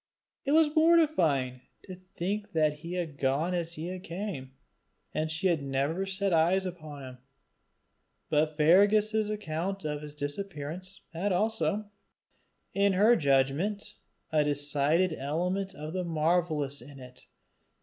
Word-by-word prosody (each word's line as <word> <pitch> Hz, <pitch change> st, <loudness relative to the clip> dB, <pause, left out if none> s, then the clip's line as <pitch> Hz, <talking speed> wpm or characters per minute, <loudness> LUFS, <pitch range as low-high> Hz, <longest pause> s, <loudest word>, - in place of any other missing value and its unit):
It 280 Hz, -, +1 dB
was 310 Hz, -1 st, +4 dB
mortifying 180 Hz, -, +3 dB, 0.2 s
to 185 Hz, -, -9 dB
think 190 Hz, +3 st, -5 dB
that 155 Hz, -2 st, +2 dB
he 170 Hz, +2 st, -7 dB
had 165 Hz, -6 st, -4 dB
gone 140 Hz, +6 st, +1 dB
as 170 Hz, -1 st, -1 dB
he 175 Hz, +3 st, -5 dB
came, 175 Hz, -7 st, -6 dB, 0.6 s
and 155 Hz, +1 st, -1 dB
she 160 Hz, +5 st, -4 dB
had 170 Hz, -5 st, +3 dB
never 140 Hz, +7 st, -1 dB
set 195 Hz, 0 st, 0 dB
eyes 175 Hz, +4 st, +3 dB
upon 155 Hz, -6 st, -7 dB
him. 130 Hz, -1 st, -9 dB, 1.1 s
But 155 Hz, 0 st, +1 dB
Fergus's 205 Hz, +6 st, +4 dB
account 195 Hz, -1 st, -3 dB
of 150 Hz, -1 st, -2 dB
his 150 Hz, -1 st, -9 dB
disappearance 165 Hz, +4 st, -5 dB
had 190 Hz, +5 st, -1 dB
also, 210 Hz, +1 st, 0 dB, 0.8 s
in 200 Hz, 0 st, +3 dB
her 215 Hz, +6 st, +5 dB
judgment, 145 Hz, -, +1 dB, 0.4 s
a 155 Hz, -1 st, +3 dB
decided 145 Hz, +4 st, +1 dB
element 180 Hz, +7 st, -2 dB
of 155 Hz, +2 st, -7 dB
the 185 Hz, -1 st, -1 dB
marvellous 155 Hz, -4 st, 0 dB
in 140 Hz, +2 st, -12 dB
it. 125 Hz, 0 st, -13 dB
170 Hz, 130 wpm, -29 LUFS, 150-195 Hz, 1.1 s, her